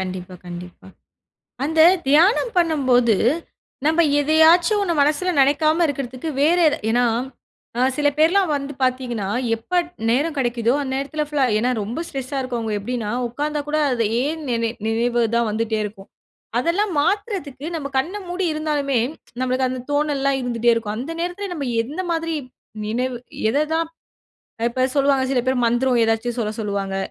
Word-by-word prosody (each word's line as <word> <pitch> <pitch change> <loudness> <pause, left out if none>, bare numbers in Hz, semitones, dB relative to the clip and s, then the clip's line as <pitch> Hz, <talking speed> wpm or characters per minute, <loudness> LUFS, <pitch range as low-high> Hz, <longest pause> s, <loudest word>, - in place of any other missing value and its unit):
கண்டிப்பா, 185 -1 -5
கண்டிப்பா. 175 +1 -9 0.8
அந்தத் 325 +4 +5
தியானம் 370 - +4
பண்ணும்போது, 260 - +3 0.7
நம்ப 320 +2 +3 0.2
எதையாச்சும் 325 +7 +5
ஒண்ணு 350 -4 0
மனசுல 305 +6 +1
நினைக்காம 310 +4 +3
இருக்குறதுக்கு 275 +1 -4
வேற 330 +4 +4
எத - - 0
ஏன்னா, 245 +2 +3 0.7
அ - - +1 0.2
சில 295 -1 +2
பேர்லாம் 345 +2 +3
வந்து 280 0 -5
பாத்தீங்கன்னா, 250 -5 -1 0.3
எப்ப 355 +11 0 0.3
நேரம் 290 +6 +1
கிடைக்குதோ 240 -1 +1
அந்த 265 -2 -4
நேரத்துல 295 +3 -2
ஃபுல்லா 295 -2 +1
ஏன்னா 245 +3 +1
ரொம்ப 225 +9 -4
ஸ்ட்ரெஸா 270 0 -4
இருக்கவங்க 235 -4 -3
எப்டின்னா, 220 +1 -3 0.2
உக்காந்தா 295 +5 -2
கூட 305 - 0
அது 230 -3 +1 0.2
ஏன் 310 +3 -2
நினை 230 -1 0 0.2
நினைவு 235 +2 +1
தான் 235 -1 +2
வந்துட்டே 220 +1 -1
இருக்கும். 200 -1 -8 0.5
அதெல்லாம் 365 +9 0
மாத்துறதுக்கு 350 - -2
நம்ப 290 -4 -3
கண்ண 355 +10 -1
மூடி 360 +1 -1
இருந்தாலுமே, 290 -4 0 0.4
நம்பளுக்கு 255 0 +1
அந்தத் 255 +1 -6
தோணல்லாம் 285 -2 +1
இருந்துட்டே 240 -1 +1
இருக்கும். 215 -2 -3
அந்த 270 +7 -5
நேரத்துல 360 +3 -3
நம்ப 295 -5 -4 0.2
எந்த 290 +10 -5
மாதிரி 330 -1 -1 0.5
நினைவு 245 +3 -1 0.3
எத 290 +6 +1
தான் 330 0 0 0.8
இப்ப 255 +2 0
சொல்லுவாங்க, 275 -1 +3
சில 255 - +2
பேர் 260 -2 +1
மந்திரம் 240 +1 +2
எதாச்சும் 225 +2 -1
சொல்லச் 215 0 -3
சொல்லுவாங்க. 200 -2 -2
270 Hz, 145 wpm, -21 LUFS, 235-315 Hz, 0.8 s, அந்தத்